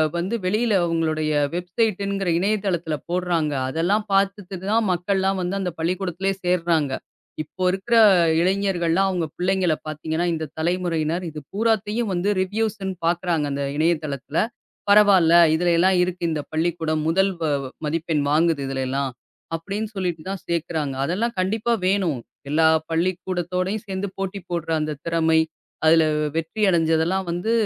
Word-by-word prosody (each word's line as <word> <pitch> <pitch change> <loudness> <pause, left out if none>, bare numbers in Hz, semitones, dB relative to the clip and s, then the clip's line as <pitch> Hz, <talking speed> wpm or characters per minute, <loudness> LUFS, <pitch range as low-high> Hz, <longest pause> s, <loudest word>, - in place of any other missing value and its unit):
வந்து 185 +7 -1
வெளியில 215 +3 +1
அவங்களுடைய 155 -2 0 0.2
வெப்சைட் 180 +4 -1
என்கிற 195 -2 -1
இணையதளத்துல 185 -5 0
போடுறாங்க. 175 -4 0 0.2
அதெல்லாம் 175 +9 +1
பாத்துட்டுதான், 195 +2 0
மக்கள்லாம் 190 +2 0
வந்து 180 +2 -2
அந்தப் 180 -3 -4
பள்ளிக்கூடத்திலேயே 185 +2 -1
சேர்றாங்க. 165 -5 +1 0.5
இப்போ 185 +5 -7
இருக்கிற 210 +5 0 0.4
இளைஞர்கள்லாம், 190 -1 +1
அவங்க 175 -3 -1
பிள்ளைங்கள 180 -2 +1
பாத்தீங்கன்னா, 160 +2 -2
இந்தத் 155 -1 -5
தலைமுறையினர் 170 0 -1
இது 155 - -7
பூராத்தையும் 220 0 0
வந்து 180 +3 0
ரிவ்யூஸ்ன்னு 200 -1 -2
பாக்குறாங்க, 170 -3 +1
அந்த 140 0 -2
இணையதளத்துல. 155 -3 -1 0.5
பரவால்ல, 200 -5 +6 0.2
இதுலைலாம் 175 +2 +3
இருக்கு 180 -1 -3
இந்த 150 -2 -1
பள்ளிக்கூடம் 160 -1 0
முதல் 195 +3 +2
வ - - 0 0.4
மதிப்பெண் 160 -1 -1
வாங்குது, 160 -1 +2
இதுலைலாம் 135 0 -2 0.4
அப்டின்னு 200 +6 -4
சொல்லிட்டுதான் 185 0 -3
சேக்கிறாங்க. 160 -4 -2
அதெல்லாம் 225 +8 -1
கண்டிப்பா 220 +5 0
வேணும். 185 -9 +1 0.3
எல்லா 160 +2 +4 0.2
பள்ளிக்கூடத்தோட 180 +2 -1
சேந்து, 195 0 -3
போட்டி 195 +1 -3
போடுற 170 -2 -3
அந்தத் 150 -1 -4
திறமை, 160 -1 +2 0.5
அதுல 160 0 +6 0.3
வெற்றி 165 +7 -3
அடைஞ்சதெல்லாம் 165 +3 +1
வந்து 175 +6 -2
175 Hz, 120 wpm, -23 LUFS, 160-195 Hz, 0.5 s, பரவால்ல